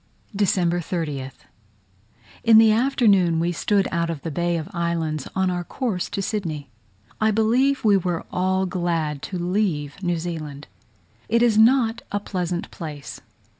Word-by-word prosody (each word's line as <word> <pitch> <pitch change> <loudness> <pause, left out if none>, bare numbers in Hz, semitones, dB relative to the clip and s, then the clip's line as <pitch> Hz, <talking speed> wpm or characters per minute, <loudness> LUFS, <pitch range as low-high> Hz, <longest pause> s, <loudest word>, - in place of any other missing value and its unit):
December 180 -3 +1
30th. 150 -6 -5 1.0
In 225 -1 +7
the 220 0 +7
afternoon 215 -8 +3
we 170 +1 +1
stood 195 +3 +1
out 170 -1 0
of 160 -4 -5
the 165 - -4
Bay 175 +3 0
of 160 -1 -5
Islands, 165 -4 -2
on 190 -1 +1
our 175 0 -2
course 205 -2 -3
to 195 - -3
Sydney. 155 - -4 0.5
I 220 - +4
believe 235 +5 +2
we 205 -2 +6
were 175 -2 -2
all 190 +1 +1
glad 165 -5 -2
to 185 - -5
leave 175 -4 -1
New 175 -2 0
Zealand. 155 -4 -6 0.6
It 235 +2 +3
is 235 -3 +4
not 230 +1 +4
a 205 - 0
pleasant 180 -3 -3
place. 150 -4 -8
180 Hz, 150 wpm, -23 LUFS, 165-210 Hz, 1.0 s, In